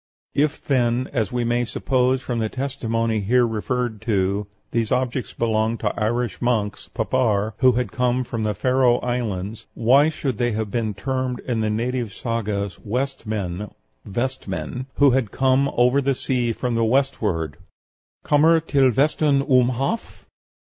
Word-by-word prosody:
If, 150 +1 0
then, 125 -1 +1
as 110 -7 0
we 125 -1 -1
may 120 +1 +1
suppose 130 +2 0
from 120 -2 -2
the 110 -1 -1
testimony 115 -4 -1
here 120 +5 +3
referred 115 0 -2
to, 100 -2 0 0.2
these 115 -2 0
objects 125 -1 -1
belonged 110 0 0
to - - 0
Irish 115 0 -1
monks 110 -4 -1
(papar), 110 -3 0
who 130 -1 +5
had 125 +1 -1
come 125 0 +1
from 115 -2 -4
the 105 -1 -1
Faroe 125 +2 +3
Islands, 110 -4 -3
why 135 +6 +5
should 140 -7 -3
they 120 -2 +1
have 110 -1 -3
been 110 -3 -1
termed 130 +4 -2
in 120 -3 -2
the 110 - 0
native 115 0 -2
sagas 105 -4 -3
'West 130 +2 -3
men' 100 -2 -3 0.3
(Vestmen), 130 +3 -4
'who 140 -1 +5
had 125 -4 +1
come 135 +3 +2
over 125 +3 +4
the 135 0 +1
sea 125 -2 0
from 125 +2 -2
the 115 0 +1
westward' 110 - 0 0.7
(kommer 160 +3 +5
til 140 -4 +3
vestan 140 +2 +2
um 125 -3 +4
haf)?" 135 - -3
120 Hz, 155 wpm, -22 LUFS, 110-130 Hz, 0.7 s, who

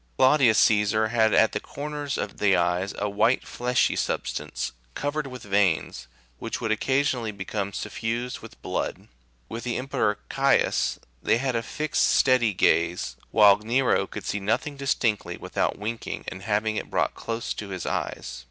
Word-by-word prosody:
Claudius 130 -4 +5
Caesar 110 +1 +3
had 110 -1 +3
at 110 - +4
the - - -2
corners 145 -1 -5
of 100 - -4
the 100 -2 +4
eyes 90 +2 +1
a 105 - -1
white 105 +5 +2
fleshy 125 +1 +1
substance, - - -2 0.2
covered 145 0 -2
with 125 -3 -9
veins, 95 -11 0 0.3
which - - -4
would 110 - -1
occasionally 125 0 +1
become 100 0 -4
suffused 120 +5 -3
with - - -13
blood; - - -3 0.4
with 115 +8 -6
the 120 -1 -2
Emperor 115 -5 0
Caius96 135 0 +2 0.2
they - - +3
had 130 0 -1
a 115 - +1
fixed, 155 +6 -1
steady 125 -4 +4
gaze, 85 -1 +2
while 105 -2 +6
Nero 120 +5 +1
could - - -7
see 105 - -2
nothing 110 +9 -1
distinctly 130 -6 -1
without - - -2
wink 110 +3 -5
ing, - - -5
and 95 - -9
having 105 +1 0
it - - -4
brought - - 0
close 115 0 -4
to 100 - -7
his 95 -2 -5
eyes. - - -3
110 Hz, 160 wpm, -26 LUFS, 100-130 Hz, 0.4 s, while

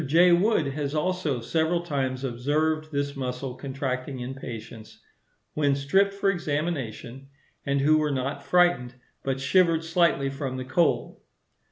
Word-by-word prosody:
J. 170 +5 +5
Wood 200 +6 +3
has 145 +1 -3
also 155 -5 -1
several 160 +7 0
times 135 -5 -2
observed 155 +5 -1
this 140 0 -2
muscle 125 -1 -4
contracting 130 -1 -4
in 125 +2 -5
patients, 115 -4 -9 0.5
when 145 -2 +2
stripped 195 +9 +2
for 200 0 +2
examination, 145 - -3 0.4
and 140 0 +1
who 155 +2 +4
were 150 -1 +1
not 140 +1 -2
frightened, 175 -7 +2 0.3
but 135 -1 -1
shivered 165 +3 +3
slightly 165 -5 +2
from 135 -2 -4
the 130 - -5
cold. 165 +6 0
140 Hz, 140 wpm, -26 LUFS, 130-165 Hz, 0.5 s, J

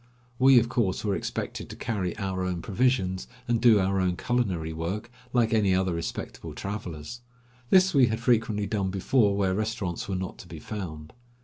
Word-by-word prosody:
We, 130 0 +7
of 120 -1 +5
course, 110 -5 0
were 100 -2 +1
expected - - -4
to - - -7
carry 95 -6 -3
our 95 -3 -2
own 90 -2 -2
provisions 100 -4 0 0.2
and 120 -1 +1
do 115 -3 +6
our 95 0 +1
own 90 -1 0
culinary 95 -11 -1
work 95 +9 -4 0.2
like 115 -3 +2
any 100 -4 +3
other 95 -1 +1
respectable 85 0 -5
travelers. 100 +1 -6 0.5
This 190 0 +5
we 135 -4 +6
had 110 0 -1
frequently 115 -3 +1
done 100 -1 -1
before 100 +2 +2
where 95 -2 +1
restaurants 105 -4 -3
were 95 - -1
not 95 0 -5
to - - -11
be - - -9
found. 80 -7 -7
100 Hz, 180 wpm, -27 LUFS, 95-115 Hz, 0.5 s, We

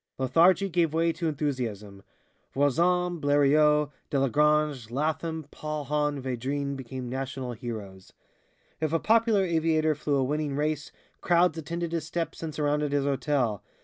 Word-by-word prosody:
Lethargy 165 +9 +4
gave 165 -3 +1
way 165 0 +2
to 165 +1 -3
enthusiasm. 120 -10 -3 0.5
Voisin, 175 +5 +2
Blériot, 145 +1 +3 0.2
Delagrange, 145 -2 +2
Latham, 155 +4 -2
Paulhan, 150 -1 -2
Védrines 135 +2 -3
became 130 -1 -6
national 130 0 -4
heroes. 105 -6 -8 0.7
If 155 0 -1
a 165 - +3
popular 220 -1 +3
aviator 160 -2 +2
flew 150 0 -1
a 135 - +2
winning 145 +1 -1
race, 150 0 -2 0.3
crowds 175 -1 +3
attended 170 +1 -4
his 165 -2 -3
steps 165 +1 -4
and 160 -1 -4
surrounded 150 -1 0
his 140 -1 +1
hotel. 135 -6 0
150 Hz, 130 wpm, -27 LUFS, 135-160 Hz, 0.7 s, Lethargy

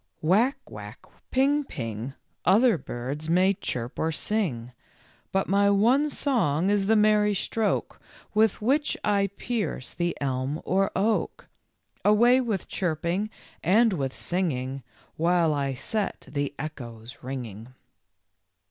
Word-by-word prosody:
" - - -46
Whack, 215 - +3
whack, - - -10 0.2
ping, 280 +3 +2
ping, 120 - -5 0.3
Other 220 +6 +5
birds 140 +6 -5
may 185 +3 +4
chirp 120 -9 -4
or 160 - +1
sing; 150 - -2 0.6
But 195 0 +1
my 200 +1 +3
one 240 +9 +4
song 195 - +1
is 200 -1 +1
the 220 - +4
merry 210 -1 +4
stroke 215 +2 -1 0.3
With 215 -1 +2
which 285 +6 +1
I 200 -1 +2
pierce 205 - -3
the 175 0 -1
elm 135 +2 -1
or 195 +2 +2
oak; 215 +3 0 0.6
Away 240 +5 +5
with 220 -7 -2
chirping 175 +4 -1 0.3
and 215 +6 +4
with 135 -6 -1
singing, 135 -7 -2 0.4
While 170 -1 +3
I 140 -2 -1
set 210 - -3
the 145 -1 -2
echoes 120 -6 -8
ringing." 120 -3 -6
185 Hz, 125 wpm, -26 LUFS, 140-215 Hz, 0.6 s, Other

